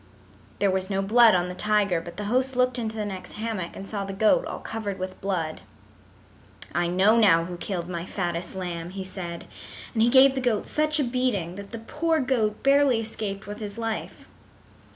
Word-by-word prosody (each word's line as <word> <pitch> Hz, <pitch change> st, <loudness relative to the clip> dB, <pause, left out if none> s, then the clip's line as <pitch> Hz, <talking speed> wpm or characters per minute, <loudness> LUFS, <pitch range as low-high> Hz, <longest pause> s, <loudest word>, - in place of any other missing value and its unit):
There 200 Hz, -1 st, +2 dB
was 190 Hz, 0 st, -1 dB
no 195 Hz, -1 st, 0 dB
blood 225 Hz, +1 st, +6 dB
on 180 Hz, 0 st, +1 dB
the 180 Hz, -, -5 dB
tiger, 205 Hz, -3 st, +1 dB
but 170 Hz, 0 st, -10 dB
the 210 Hz, -, -4 dB
host 255 Hz, +5 st, 0 dB
looked 250 Hz, 0 st, +2 dB
into 220 Hz, -1 st, -3 dB
the 215 Hz, -1 st, -2 dB
next 190 Hz, -2 st, -6 dB
hammock 215 Hz, -6 st, -4 dB
and 195 Hz, -, -8 dB
saw 200 Hz, -1 st, -3 dB
the 195 Hz, 0 st, -5 dB
goat 220 Hz, -, +3 dB
all -, -, -5 dB
covered 210 Hz, -3 st, -5 dB
with 185 Hz, 0 st, -6 dB
blood. 170 Hz, -5 st, -2 dB, 1.1 s
"I 175 Hz, 0 st, +1 dB
know 190 Hz, +6 st, +4 dB
now 165 Hz, -7 st, +5 dB
who 175 Hz, 0 st, -6 dB
killed 175 Hz, -1 st, -4 dB
my 175 Hz, 0 st, -5 dB
fattest 175 Hz, -1 st, -3 dB
lamb," 175 Hz, -2 st, -4 dB
he 190 Hz, +1 st, -6 dB
said, 175 Hz, -3 st, -6 dB, 0.5 s
and 225 Hz, -, +1 dB
he 235 Hz, -, +5 dB
gave 265 Hz, +1 st, +7 dB
the 265 Hz, -, -2 dB
goat 235 Hz, -5 st, 0 dB
such 305 Hz, 0 st, +2 dB
a -, -, +3 dB
beating 240 Hz, -9 st, -1 dB
that 200 Hz, +1 st, -9 dB
the 230 Hz, -, -6 dB
poor 320 Hz, +8 st, 0 dB
goat 235 Hz, -6 st, 0 dB
barely 275 Hz, -3 st, +4 dB
escaped 215 Hz, -2 st, -4 dB
with 205 Hz, +1 st, -7 dB
his 210 Hz, 0 st, -6 dB
life. 225 Hz, -1 st, -4 dB
205 Hz, 200 wpm, -26 LUFS, 185-235 Hz, 1.1 s, gave